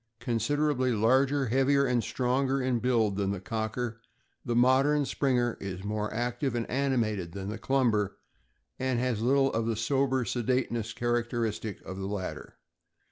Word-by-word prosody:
— -, -, -50 dB
Considerably 130 Hz, +2 st, +1 dB
larger, 130 Hz, +6 st, +3 dB
heavier, 135 Hz, +3 st, +3 dB
and 125 Hz, -3 st, +1 dB
stronger 130 Hz, +2 st, 0 dB
in 130 Hz, -2 st, 0 dB
build 115 Hz, -5 st, +1 dB
than 100 Hz, -1 st, 0 dB
the 100 Hz, -1 st, -2 dB
Cocker; 115 Hz, +3 st, -3 dB, 0.4 s
the 120 Hz, -, -2 dB
modern 135 Hz, +4 st, +4 dB
Springer 125 Hz, -4 st, 0 dB
is 95 Hz, -1 st, -5 dB
more 105 Hz, +1 st, -2 dB
active 120 Hz, +3 st, -2 dB
and 115 Hz, -1 st, -2 dB
animated 115 Hz, -10 st, 0 dB
than 100 Hz, 0 st, -5 dB
the 105 Hz, +1 st, -5 dB
Clumber, 115 Hz, -6 st, +1 dB, 0.6 s
and 130 Hz, -1 st, 0 dB
has 120 Hz, -3 st, 0 dB
little 135 Hz, +3 st, +3 dB
of 115 Hz, 0 st, 0 dB
the 115 Hz, -, 0 dB
sober 130 Hz, +2 st, +1 dB
sedateness 120 Hz, -2 st, -1 dB
characteristic 120 Hz, -3 st, -2 dB
of 95 Hz, -, -6 dB
the 95 Hz, 0 st, -4 dB
latter. 100 Hz, -2 st, -5 dB
120 Hz, 150 wpm, -29 LUFS, 110-130 Hz, 0.6 s, modern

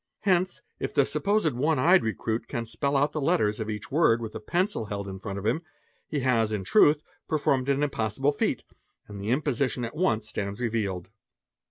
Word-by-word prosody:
tence, 185 Hz, -1 st, +2 dB, 0.2 s
if -, -, -4 dB
the -, -, +5 dB
supposed 200 Hz, -7 st, +1 dB
one 150 Hz, +6 st, +1 dB
eyed 175 Hz, +9 st, +5 dB
'recruit 110 Hz, +1 st, -2 dB
can 115 Hz, -1 st, -3 dB
spell 140 Hz, +4 st, 0 dB
out 145 Hz, +2 st, +2 dB
the 155 Hz, -, -3 dB
letters 135 Hz, -9 st, +2 dB
of 110 Hz, 0 st, -3 dB
each 105 Hz, -1 st, -5 dB
"word 140 Hz, -6 st, +4 dB
with 115 Hz, -2 st, -6 dB
a -, -, -5 dB
pencil 175 Hz, -, -1 dB
held 100 Hz, -1 st, -4 dB
in 95 Hz, 0 st, -6 dB
front 100 Hz, 0 st, -5 dB
of 100 Hz, -, -6 dB
him, 120 Hz, +9 st, +1 dB, 0.5 s
he 145 Hz, -, -2 dB
has 115 Hz, -4 st, +2 dB
in 105 Hz, -3 st, -2 dB
truth 150 Hz, -, +4 dB, 0.3 s
performed 140 Hz, -4 st, +1 dB
an 140 Hz, +1 st, +2 dB
im 145 Hz, -, +2 dB
possible 110 Hz, +6 st, 0 dB
feat, 145 Hz, -, -1 dB, 0.4 s
and 100 Hz, -1 st, -8 dB
the 100 Hz, -, -3 dB
imposition 130 Hz, -2 st, 0 dB
at 115 Hz, -, -7 dB
once 115 Hz, -10 st, +1 dB
stands 100 Hz, -1 st, -4 dB
revealed." 100 Hz, -6 st, -2 dB
120 Hz, 200 wpm, -27 LUFS, 110-150 Hz, 0.5 s, the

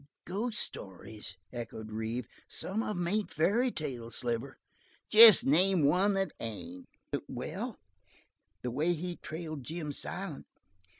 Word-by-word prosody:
"Ghost 215 Hz, +6 st, -2 dB
stories?" 95 Hz, 0 st, -4 dB, 0.2 s
echoed 110 Hz, -2 st, -6 dB
Reeve. 110 Hz, +3 st, -3 dB, 0.2 s
"Some 205 Hz, +4 st, -2 dB
of 210 Hz, -4 st, -3 dB
'em 175 Hz, -1 st, -1 dB
ain't 210 Hz, +3 st, 0 dB
fairy 210 Hz, -, +2 dB
tales, 125 Hz, -, -5 dB
Sliver." 120 Hz, +2 st, -3 dB, 0.5 s
"Jest 220 Hz, -2 st, +10 dB
name 175 Hz, +4 st, +4 dB
one 185 Hz, +8 st, +4 dB
that 195 Hz, -4 st, 0 dB
ain't!" 90 Hz, -5 st, -6 dB, 0.4 s
"Well, 190 Hz, -, -5 dB, 0.9 s
the 125 Hz, -, -2 dB
way 155 Hz, +8 st, +1 dB
he 175 Hz, +1 st, -4 dB
trailed 155 Hz, -3 st, -6 dB
Jim 155 Hz, +2 st, -4 dB
Silent. 175 Hz, +2 st, -5 dB
155 Hz, 125 wpm, -31 LUFS, 120-195 Hz, 0.9 s, Jest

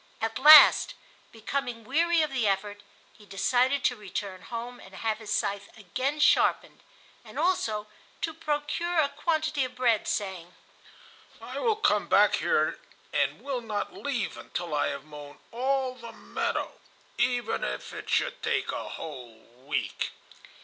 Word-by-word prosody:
At 225 Hz, +1 st, -2 dB
last, 300 Hz, +2 st, +9 dB, 0.4 s
becoming 240 Hz, +1 st, -4 dB
weary 330 Hz, +6 st, +2 dB
of 305 Hz, -, -2 dB
the 250 Hz, -5 st, 0 dB
effort, 205 Hz, +1 st, -1 dB, 0.3 s
he 215 Hz, -, -19 dB
decided 245 Hz, +8 st, +1 dB
to 245 Hz, -, +2 dB
return 195 Hz, -3 st, -6 dB
home 240 Hz, +1 st, -7 dB
and 190 Hz, 0 st, -14 dB
have 220 Hz, +1 st, -2 dB
his 215 Hz, -2 st, -7 dB
scythe 200 Hz, 0 st, -1 dB
again 255 Hz, -, -3 dB
sharpened, 300 Hz, -, +3 dB, 0.4 s
and -, -, -12 dB
also 220 Hz, -, 0 dB, 0.4 s
to 325 Hz, -, -2 dB
procure 320 Hz, +2 st, -2 dB
a 300 Hz, -3 st, +4 dB
quantity 310 Hz, -1 st, 0 dB
of 255 Hz, 0 st, -5 dB
bread, 240 Hz, -4 st, +2 dB
saying: 185 Hz, -3 st, -3 dB, 0.8 s
"I -, -, -7 dB
will 455 Hz, -3 st, +2 dB
come 435 Hz, -, +1 dB
back -, -, +5 dB
here -, -, +1 dB, 0.3 s
and -, -, 0 dB
will 270 Hz, -3 st, -3 dB
not 215 Hz, -3 st, -4 dB
leave 260 Hz, -7 st, -3 dB
until 175 Hz, -3 st, -5 dB
I 150 Hz, -, +1 dB
have 140 Hz, 0 st, -5 dB
mown 145 Hz, -1 st, -11 dB
all 260 Hz, +2 st, 0 dB
the 235 Hz, -2 st, -10 dB
meadow, -, -, -3 dB, 0.4 s
even 245 Hz, -1 st, 0 dB
if -, -, -4 dB
it -, -, -8 dB
should -, -, 0 dB
take -, -, 0 dB
a -, -, -5 dB
whole 125 Hz, -7 st, -8 dB, 0.3 s
week." 150 Hz, -, -2 dB
240 Hz, 150 wpm, -28 LUFS, 200-280 Hz, 0.8 s, last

